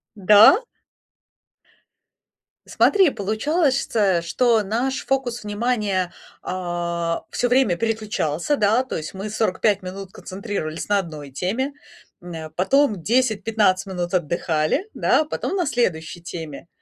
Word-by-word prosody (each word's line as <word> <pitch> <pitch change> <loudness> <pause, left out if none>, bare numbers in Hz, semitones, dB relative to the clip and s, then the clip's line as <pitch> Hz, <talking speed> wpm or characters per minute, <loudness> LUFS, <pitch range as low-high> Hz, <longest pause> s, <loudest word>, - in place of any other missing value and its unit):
Да? 210 - +7 2.1
Смотри, 385 -5 +4
получалось, 270 - 0
чтэ 195 -6 +1
что 220 +6 +2
наш 245 +6 -2
фокус 250 -3 -1
внимания, 210 -4 -1 0.3
а, 170 -2 -3
всё 245 - 0
время 245 -8 +3
переключался, 215 - -1
да, 215 +3 +3
то 260 - -5
есть 155 - -6
мы 195 +2 -5
45 210 -1 +1
минут 190 +1 -8
концентрировались 185 -5 -5
на 205 -1 +3
одной 155 -6 -7
теме, 215 - -2 0.5
м, 175 0 -9
э, 160 -1 -7
потом 215 - +2
10-15 220 -3 +1
минут 180 -2 -4
отдыхали, 170 - 0
да, 310 - +2
потом 310 - -3
на 360 -3 0
следующей 175 - -1
теме. 165 -2 -8
205 Hz, 120 wpm, -22 LUFS, 175-240 Hz, 2.1 s, Да